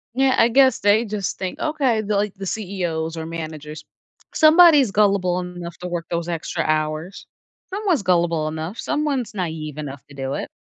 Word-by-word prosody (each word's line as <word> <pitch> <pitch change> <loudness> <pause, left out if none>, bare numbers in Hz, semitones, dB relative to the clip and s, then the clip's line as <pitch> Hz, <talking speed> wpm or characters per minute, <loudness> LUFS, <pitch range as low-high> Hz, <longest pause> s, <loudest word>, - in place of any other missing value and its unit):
Yeah, 265 0 +3
I 230 - +5
guess 260 +2 +4
they 205 +3 +3
just 205 -2 -4
think, 185 -1 -4
okay, 275 -8 +1
the 210 -1 -2
like, 205 0 -1
the 195 0 -7
CEOs 175 -6 -3
or 160 - -4
managers, 155 -2 -7 0.5
somebody's 310 - +6
gullible 195 -3 +2
enough 175 -1 -7
to 180 - -5
work 175 -1 -4
those 170 0 -2
extra 165 -2 -2
hours. 155 +4 -2 0.5
Someone's 380 - 0
gullible 170 -3 +1
enough, 160 +6 -5
someone's 290 -7 -2
naive 160 -5 -4
enough 140 -2 -7
to 145 - -14
do 135 0 -4
it. - - -5
180 Hz, 170 wpm, -22 LUFS, 160-225 Hz, 0.5 s, somebody's